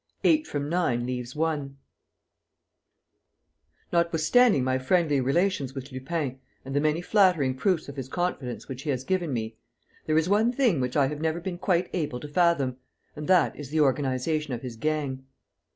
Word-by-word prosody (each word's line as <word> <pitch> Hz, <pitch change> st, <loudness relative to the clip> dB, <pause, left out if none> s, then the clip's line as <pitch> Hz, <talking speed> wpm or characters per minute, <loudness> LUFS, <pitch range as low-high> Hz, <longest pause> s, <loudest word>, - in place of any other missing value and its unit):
EIGHT 310 Hz, -1 st, +3 dB
FROM 145 Hz, -1 st, -3 dB
NINE 155 Hz, -8 st, 0 dB
LEAVES 125 Hz, 0 st, -4 dB
ONE 150 Hz, -3 st, -2 dB, 2.2 s
Notwithstanding 170 Hz, -, +3 dB
my 130 Hz, 0 st, +1 dB
friendly 145 Hz, 0 st, +2 dB
relations 140 Hz, -1 st, 0 dB
with 135 Hz, +1 st, -7 dB
Lupin 130 Hz, 0 st, -3 dB, 0.3 s
and 135 Hz, +1 st, -5 dB
the -, -, +4 dB
many 155 Hz, +3 st, +1 dB
flattering 180 Hz, -9 st, +3 dB
proofs 180 Hz, +3 st, 0 dB
of 140 Hz, 0 st, -9 dB
his 130 Hz, -1 st, -5 dB
confidence 150 Hz, -7 st, -3 dB
which 130 Hz, -1 st, -6 dB
he 150 Hz, -, -5 dB
has 130 Hz, -2 st, -1 dB
given 175 Hz, -1 st, -1 dB
me, 110 Hz, -2 st, -3 dB, 0.5 s
there 155 Hz, 0 st, +2 dB
is 160 Hz, +1 st, +2 dB
one 215 Hz, +5 st, +3 dB
thing 240 Hz, -, +2 dB
which 125 Hz, +2 st, -1 dB
I 140 Hz, -, +5 dB
have 150 Hz, +2 st, -4 dB
never 160 Hz, +1 st, 0 dB
been 175 Hz, 0 st, -5 dB
quite 180 Hz, -1 st, +1 dB
able 145 Hz, -8 st, -2 dB
to 150 Hz, -, -7 dB
fathom, 145 Hz, -5 st, +2 dB, 0.4 s
and 150 Hz, 0 st, -6 dB
that 185 Hz, -2 st, +4 dB
is 145 Hz, -3 st, -8 dB
the 155 Hz, +1 st, +1 dB
organization 140 Hz, +1 st, 0 dB
of 120 Hz, -, -9 dB
his 125 Hz, -3 st, -6 dB
gang. 140 Hz, 0 st, -2 dB
150 Hz, 170 wpm, -26 LUFS, 130-170 Hz, 2.2 s, I